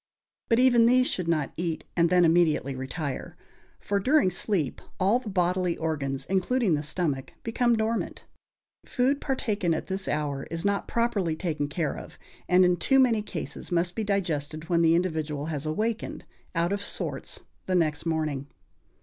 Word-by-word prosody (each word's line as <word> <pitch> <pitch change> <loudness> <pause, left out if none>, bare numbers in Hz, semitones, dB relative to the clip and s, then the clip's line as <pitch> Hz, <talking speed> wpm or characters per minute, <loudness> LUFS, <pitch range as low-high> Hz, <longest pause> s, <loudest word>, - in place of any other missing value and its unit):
But 230 - +4
even 240 -2 +5
these 255 +1 +5
should 180 -8 -2
not 155 -4 0
eat 165 -2 -2
and 170 -1 +3
then 180 -1 +5
immediately 160 -5 +3
retire; 135 +2 -5 0.4
for 200 0 -1
during 260 -2 +3
sleep 175 - -1 0.2
all 200 +6 +3
the 235 - -7
bodily 180 -2 +1
organs, 140 -4 -2
including 195 +2 +1
the 145 - +1
stomach, 150 -3 -2
become 240 +1 +2
dormant. 220 +1 -2 0.6
Food 270 +3 0
partaken 210 - 0
at - - -4
this 190 0 -3
hour 145 -2 -2
is 165 +3 -3
not 200 0 0
properly 210 -9 0
taken 160 -4 -2
care 150 0 -2
of, - - -10 0.3
and 180 +1 +6
in 180 0 +3
too 270 +11 +3
many 240 -5 +4
cases 210 - -6
must 175 0 +1
be 220 - -2
digested 160 -6 -2
when 170 -1 +3
the 165 0 +5
individual 155 -4 -1
has 150 +1 -3
awakened, 220 +8 -2 0.3
out 170 +3 +1
of 200 - -2
sorts, - - -4 0.3
the 185 - +1
next 160 -2 +1
morning. 155 -4 -1
175 Hz, 165 wpm, -27 LUFS, 155-210 Hz, 0.6 s, and